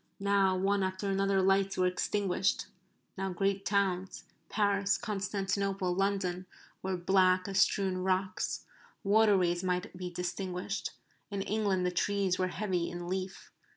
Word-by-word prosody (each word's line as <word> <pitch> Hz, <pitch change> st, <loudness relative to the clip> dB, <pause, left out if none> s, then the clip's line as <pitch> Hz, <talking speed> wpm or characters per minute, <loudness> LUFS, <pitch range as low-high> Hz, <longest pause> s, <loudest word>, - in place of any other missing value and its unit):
Now 195 Hz, -1 st, +3 dB
one 195 Hz, +2 st, +1 dB
after 190 Hz, +1 st, -1 dB
another 195 Hz, 0 st, +2 dB
lights 195 Hz, +1 st, +2 dB
were 185 Hz, -, +3 dB
extinguished. 190 Hz, +1 st, 0 dB, 0.5 s
Now 195 Hz, 0 st, -1 dB
great 195 Hz, +2 st, -1 dB
towns 190 Hz, -2 st, 0 dB, 0.3 s
Paris 200 Hz, -1 st, +2 dB
Constantinople 195 Hz, -3 st, -1 dB
London 185 Hz, -1 st, -1 dB, 0.3 s
were 190 Hz, -1 st, -2 dB
black 185 Hz, +1 st, +3 dB
as 195 Hz, -1 st, 0 dB
strewn 190 Hz, -1 st, +2 dB
rocks. 185 Hz, 0 st, -1 dB, 0.4 s
Waterways 195 Hz, -4 st, +3 dB
might 180 Hz, -1 st, -1 dB
be 180 Hz, 0 st, -5 dB
distinguished. 180 Hz, +2 st, -3 dB, 0.4 s
In 200 Hz, -2 st, -2 dB
England 200 Hz, -4 st, 0 dB
the 180 Hz, -, +1 dB
trees 190 Hz, 0 st, 0 dB
were 185 Hz, -, +2 dB
heavy 180 Hz, -2 st, -1 dB
in 175 Hz, 0 st, -6 dB
leaf. 185 Hz, +1 st, -4 dB
190 Hz, 130 wpm, -31 LUFS, 185-200 Hz, 0.5 s, Now